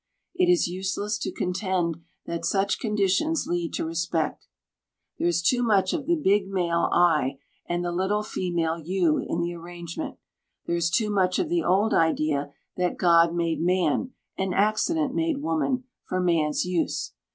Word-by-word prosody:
It 360 0 +2
is 355 - +3
useless 190 +4 -2
to - - -3
contend 180 -3 -1 0.3
that 170 0 -4
such 195 +3 +1
conditions 210 - +1
lead 175 -1 -2
to - - -2
respect. 165 -1 -2 0.7
There - - +1
is 170 -1 +1
too 245 +7 +3
much 210 -5 +2
of 305 -5 -3
the 345 - +3
big 205 - +2
male 175 -3 0
I, 150 -6 +3 0.3
and 175 0 -1
the 175 - -1
little 190 +4 0
female 170 -5 -2
you, 170 -1 +1
in 170 - -2
the 170 0 -2
arrangement. 170 0 -7 0.5
There 170 - -1
is 170 0 +1
too 210 +4 +1
much 185 -2 +2
of 340 - -1
the 345 0 +1
old 200 +5 +2
idea 155 -3 +1 0.3
that 180 -1 0
God 170 -1 +4
made 170 -2 0
man, 180 - +1 0.2
and 190 -1 -2
accident 260 - +1
made 325 -2 0
woman, 250 - 0 0.2
for 185 - -2
man's 165 -4 +1
use. 180 -2 -1
180 Hz, 165 wpm, -26 LUFS, 170-210 Hz, 0.7 s, God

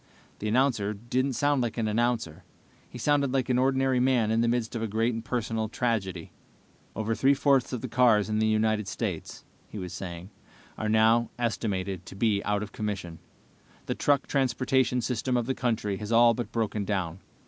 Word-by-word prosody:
The 105 - -3
announcer 110 -3 +1
didn't 125 +5 -1
sound 145 +1 +1
like 120 -1 -2
an 115 -2 0
announcer. 115 -7 -1 0.5
He - - -9
sounded 140 +1 +1
like 130 -2 0
an 125 -1 +2
ordinary 130 0 +2
man 125 -4 +2
in 115 +1 +2
the 120 - +2
midst 120 0 -1
of 115 - -2
a 115 - -1
great 115 +3 0
and 115 0 -4
personal 115 -3 -2
tragedy. 100 -8 -2 0.6
"Over 110 +1 -1
three 135 +4 +3
fourths 135 -2 +2
of 125 -3 -3
the 130 - -4
cars 115 -3 +3
in 110 0 0
the 110 - +2
United 110 -1 +1
States," - - -5 0.2
he - - -9
was 90 -3 -6
saying, 90 +1 -7 0.4
"are 110 - -3
now 110 +2 +4
estimated 100 -5 -2
to - - -9
be 100 -1 +1
out 105 0 0
of 105 - -8
commission. 95 -6 -5 0.7
The - - -1
truck 140 -2 +1
transportation 130 -1 +1
system 125 +1 -1
of 120 - 0
the 130 - -1
country 110 -6 -1
has 105 +3 -6
all 115 0 +6
but 120 +1 -5
broken 110 -2 -1
down. 95 -4 -2
115 Hz, 190 wpm, -27 LUFS, 105-125 Hz, 0.7 s, all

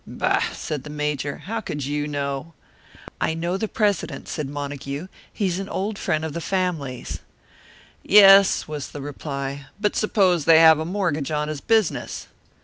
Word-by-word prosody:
"Bah!" - - 0
said 150 -4 -5
the 150 - -9
Major. 150 -1 -3
"How 225 +3 -3
could 145 -9 -4
you 145 +1 -2
know?" 140 +2 -4 0.7
"I 160 - +1
know 170 +2 -2
the 220 +3 -2
president," 205 -4 -1
said 150 -4 -4
Montague. 140 +1 -5 0.3
"He's 190 -3 -1
an 195 - -5
old 205 +2 -3
friend 155 +1 -1
of 155 - -5
the 170 - -4
family's." 165 -10 -2 0.8
"Yes," 195 -1 +7
was 150 -3 -5
the 145 - -6
reply. 140 -1 -5
"But 210 0 0
suppose 185 -7 +2
they 165 -1 +7
have 160 -1 +7
a 160 - -2
mortgage 170 -6 -1
on 150 -1 -1
his 150 -2 -5
business?" 220 -6 0
155 Hz, 160 wpm, -23 LUFS, 145-190 Hz, 0.8 s, Yes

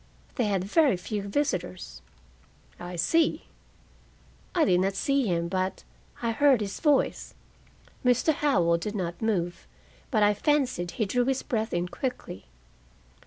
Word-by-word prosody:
"They 245 - 0
had 195 -3 0
very 265 - +3
few 205 +3 -4
visitors." 180 - -2 0.8
"I 175 0 -7
see." 320 - +1 1.1
"I 330 -3 +4
did 180 -8 +3
not 195 +1 0
see 275 +3 +1
him, 170 -2 0
but 185 +1 -2 0.4
I 230 - +1
heard 275 +1 +4
his 200 -2 -4
voice." 295 -4 +1 0.7
Mr. 250 +5 +3
Howell 175 - +2
did 210 +5 -4
not 175 -3 -4
move, 180 -6 -1 0.4
but 215 -6 +2
I 205 0 +5
fancied 255 - 0
he 220 - +1
drew 245 +5 +1
his 265 0 0
breath 225 -4 -2
in 175 +1 -1
quickly. 180 - -5
210 Hz, 140 wpm, -27 LUFS, 180-265 Hz, 1.1 s, I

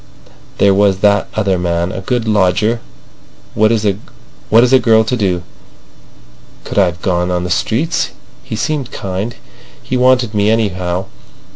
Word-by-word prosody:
There 100 -1 +4
was 100 -1 +2
that 105 0 +3
other 100 -4 0
man—a 85 +2 -2
good 115 +3 -2
lodger. 105 +3 +2 0.7
What 110 +1 +3
is 110 -2 0
a 105 - +1
girl 110 -2 +4
to 110 +3 -1
do? 95 -6 -1 1.2
Could - - -2
I've 90 -3 0
gone 90 -1 0
on 90 -1 -1
the 90 - -4
streets? 135 - 0 0.3
He 130 -4 -6
seemed 140 +2 -2
kind. 100 +5 -4 0.5
He 130 - -2
wanted 125 -3 +3
me, 105 0 +2
anyhow. 95 -5 -1
105 Hz, 135 wpm, -15 LUFS, 90-115 Hz, 1.2 s, There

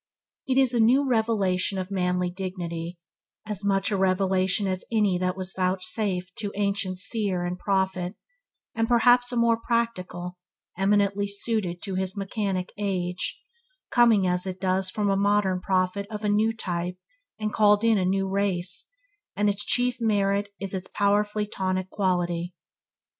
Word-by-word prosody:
It 260 -1 +1
is 260 -2 +4
a 240 - +1
new 255 +5 +4
revelation 210 -6 +1
of 185 +1 -4
manly 180 -1 0
dignity; 175 -2 -5 0.5
as 210 -2 -3
much 195 0 +1
a - - +1
revelation 190 +1 +2
as 185 -1 -2
any 205 -5 +2
that 185 0 -1
was 185 0 -4
vouchsafed 185 0 -1
to 205 -2 -3
ancient 200 -2 -1
seer 200 -2 -1
and 180 +1 -3
prophet, 190 -1 0 0.6
and 225 0 0
perhaps 245 +1 +4
a - - -3
more 235 -1 +4
practical, 185 -7 -2 0.4
eminently 200 +1 +2
suited 200 -3 -2
to 195 - -4
his 190 +1 -2
mechanic 195 -2 -2
age, 180 -3 -2 0.5
coming, 230 -5 +5
as 180 +1 +1
it 185 0 -5
does 185 0 0
from 205 0 0
a - - +2
modern 200 -2 +2
prophet 185 +2 0
of 215 -1 -6
a 210 - +1
new 215 +2 +3
type 180 -4 -4 0.4
and 215 -1 -3
called 210 0 +4
in 225 -3 +4
a - - +1
new 195 +1 +1
race, 190 -2 -1 0.5
and 205 +1 +2
its 200 +1 -4
chief 245 0 +1
merit 205 -2 +1
is 195 -1 -4
its 190 -1 -3
powerfully 210 +1 +1
tonic 185 -2 -2
quality. 175 -3 -1
195 Hz, 155 wpm, -26 LUFS, 185-210 Hz, 0.6 s, coming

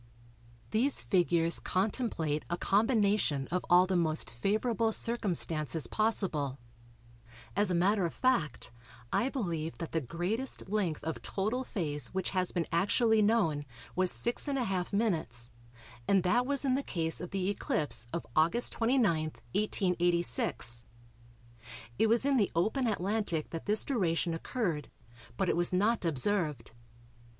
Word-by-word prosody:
These 255 +6 +3
figures 170 -3 +2
contemplate 185 - -1
a 175 - -1
combination 205 - +2
of 180 +1 0
all 180 +1 +6
the 185 0 -1
most 160 -3 +1
favourable 215 - 0
circumstances 165 - 0
possible; 160 - 0 1.0
as 205 -2 +2
a 180 - +1
matter 195 +3 +2
of - - -6
fact, 245 - 0 0.4
I 250 - +2
believe 170 - -3
that 165 - -6
the 160 - 0
greatest 180 - -2
length 190 -7 -1
of 160 +1 -4
total 215 +7 -2
phase 150 - -3
which 190 - -1
has 185 -2 0
been 170 -3 -1
actually 215 +6 +3
known 205 -9 +2 0.3
was 185 -1 +3
6½^m 195 - -1 0.6
and 195 -2 +3
that 240 +7 +2
was 280 0 +2
in 260 - +2
the 270 - +1
case 165 -10 -3
of 180 - -6
the 190 -1 -2
eclipse 200 - -1
of 170 - -4
August 170 +10 +3
29, 245 +3 +2 0.5
1886. 175 - +1 1.1
It 225 - +4
was 230 +3 +2
in 280 -1 +3
the 205 -5 +2
open 220 +9 +1
Atlantic 200 -5 -1
that 165 +3 -6
this 210 +1 +1
duration 175 - 0
occurred, 165 - -3 0.5
but 190 - 0
it - - +2
was 175 0 +1
not 210 +5 +1
observed. 155 - -1
185 Hz, 135 wpm, -31 LUFS, 165-220 Hz, 1.1 s, all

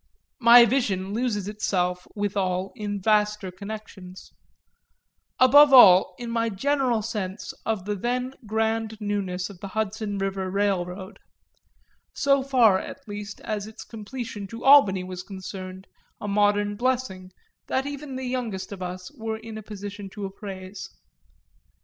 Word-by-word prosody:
My 235 0 +9
vision 200 -6 0
loses 215 -4 -1
itself 180 -4 -1
withal 195 -2 -1
in 205 -3 -4
vaster 210 -1 +1
connections 200 -2 -9 1.1
above 285 +3 +7
all 185 -7 +8
in 240 -1 -6
my 230 0 0
general 250 +1 0
sense 205 -3 -4
of 215 -5 -1
the 210 - -1
then 250 +5 -2
grand 220 0 -1
newness 200 -3 -3
of 185 - -14
the 200 - -6
Hudson 215 0 -3
River 195 -1 -2
Railroad; 190 0 -2 1.0
so 275 -1 +3
far 245 -8 +4
at - - -9
least 205 0 -7
as 210 -1 -4
its 220 - -10
completion 225 -1 -7
to 230 +4 -9
Albany 210 -10 +6
was 185 0 -6
concerned, 190 -1 -8 0.3
a 210 - -5
modern 205 0 +2
blessing 240 -6 -2 0.4
that 265 +1 0
even 285 -1 -6
the 260 0 -4
youngest 230 -7 -3
of 195 -2 -8
us 185 +6 -6
were 220 -3 -4
in 225 0 -9
a 220 - -6
position 205 -1 -8
to 205 +1 -6
appraise. 190 -1 -8
205 Hz, 135 wpm, -25 LUFS, 190-230 Hz, 1.1 s, My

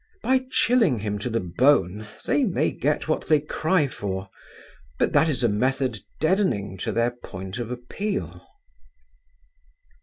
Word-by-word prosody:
By 260 0 +2
chilling 230 - +3
him 105 -1 -3
to 115 - -3
the 115 0 0
bone 105 +1 +2 0.2
they 285 - +2
may 195 -8 +1
get 150 +2 -1
what 155 - -1
they 155 -1 +5
cry 155 +2 +1
for. 95 -5 -5 0.7
But - - +1
that 160 - +4
is 130 -5 -1
a - - +5
method 125 +2 0 0.2
deadening 145 - +1
to - - -1
their 115 +1 +1
point 95 -3 -8
of 120 -2 -4
appeal. 195 +12 -4
125 Hz, 145 wpm, -25 LUFS, 105-160 Hz, 0.7 s, they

